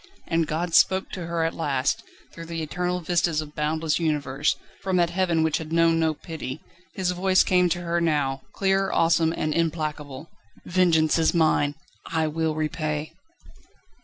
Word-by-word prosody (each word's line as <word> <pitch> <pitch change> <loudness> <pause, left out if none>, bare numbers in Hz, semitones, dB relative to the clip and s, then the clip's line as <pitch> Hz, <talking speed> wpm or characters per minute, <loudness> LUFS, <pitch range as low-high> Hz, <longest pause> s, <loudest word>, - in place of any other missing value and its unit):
And 165 -1 +1
God 170 +2 -2
spoke 190 +2 +4
to 175 -3 -5
her 170 -1 -1
at 165 - 0
last; 140 -5 0 0.3
through 165 0 -9
the 165 -1 -4
eternal 180 +3 -2
vistas 170 -2 +1
of 150 -1 -6
boundless 155 +1 0
universe, 150 -3 0 0.3
from 190 -1 0
that 170 -1 +2
heaven 175 -3 +1
which 160 -1 +1
had 160 -1 -8
known 165 0 +3
no 160 -1 +1
pity, 155 -3 -7 0.4
His 185 -2 0
voice 185 +1 +3
came 180 -1 +3
to 175 +1 -1
her 170 0 -1
now, 145 -5 0
clear, 195 0 +1
awesome, 165 -1 +3
and 155 -2 -2
implacable: 155 -3 -2 0.4
"Vengeance 170 -3 +3
is 165 +2 +2
mine! 155 -3 +2 0.3
I 160 -1 0
will 160 0 -1
repay!" 155 0 -3
165 Hz, 160 wpm, -25 LUFS, 155-175 Hz, 0.4 s, spoke